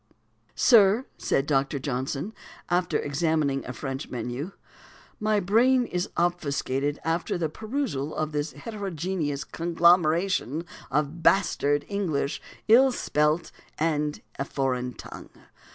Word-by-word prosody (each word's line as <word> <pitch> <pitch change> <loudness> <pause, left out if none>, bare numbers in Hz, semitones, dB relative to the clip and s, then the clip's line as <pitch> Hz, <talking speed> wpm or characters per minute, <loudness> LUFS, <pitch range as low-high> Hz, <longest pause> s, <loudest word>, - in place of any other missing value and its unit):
"Sir," 220 +1 +5
said 135 - +1
Dr. 140 0 +1
Johnson, 135 - -3 0.4
after 180 0 +2
examining 145 -2 0
a - - -3
French 135 +3 -5
menu, 125 - -4 0.7
"my 215 0 +2
brain 240 +7 +3
is 180 -5 -2
obfuscated 145 -4 0
after 165 +2 -1
the 165 -3 -1
perusal 215 - -3
of 155 0 -2
this 150 +1 -2
heterogeneous 170 - -3
conglomeration 170 - +2 0.2
of 150 +4 -1
bastard 145 -7 +2
English 170 -9 -1 0.3
ill 255 +4 +7
spelt, 150 -6 0 0.3
and 150 -2 -1 0.2
a - - +1
foreign 125 -3 -2
tongue. - - -10
155 Hz, 110 wpm, -26 LUFS, 140-190 Hz, 0.7 s, ill